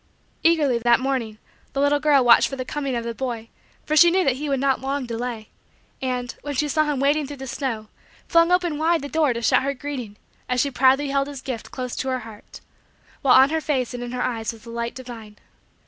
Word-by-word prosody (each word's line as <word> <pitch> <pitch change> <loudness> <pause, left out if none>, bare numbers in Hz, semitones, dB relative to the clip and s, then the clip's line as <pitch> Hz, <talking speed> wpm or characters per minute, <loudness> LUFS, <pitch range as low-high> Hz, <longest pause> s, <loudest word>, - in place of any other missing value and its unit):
Eagerly, 300 -7 +3
that 235 +1 +4
morning, 255 -5 -2 0.4
the 275 - -2
little 285 +1 +3
girl 285 -4 +4
watched 235 - +6
for 270 - -5
the 255 -1 -5
coming 275 -2 -3
of 235 - -2
the 235 0 -4
boy 230 -2 -5 0.4
for 305 - 0
she 345 +2 +8
knew 370 +2 +2
that 265 -5 +1
he 295 +1 -4
would 275 -1 0
not 270 -1 +1
long 270 0 -2
delay; 235 -1 -5 0.5
and, 250 -2 -2
when 290 -1 -5
she 300 +3 +1
saw 310 +2 +2
him 295 -3 -1
wading 285 +1 +2
through 285 0 -8
the 265 - -7
snow, 235 -5 -4 0.4
flung 335 +1 +4
open 350 -4 +1
wide 325 -1 +2
the - - -4
door 310 -3 +2
to 235 -1 -4
shout - - +4
her 275 +1 -2
greeting 250 -7 -6 0.3
as 250 0 +1
she 280 +2 +1
proudly 265 +3 +3
held 275 0 0
his 285 -2 -7
gift 255 -5 -5
close 250 -2 -5
to 265 - -3
her 255 -1 -1
heart; 220 -2 -12 0.6
while 265 -3 +5
on 265 +2 +6
her 320 0 0
face 260 -5 -1
and 245 - -5
in 245 0 -5
her 250 0 -2
eyes 225 -3 -2
was 225 -2 -15
the 230 - -10
light 235 0 -4
divine. 230 -5 -10
265 Hz, 235 wpm, -23 LUFS, 240-290 Hz, 0.6 s, she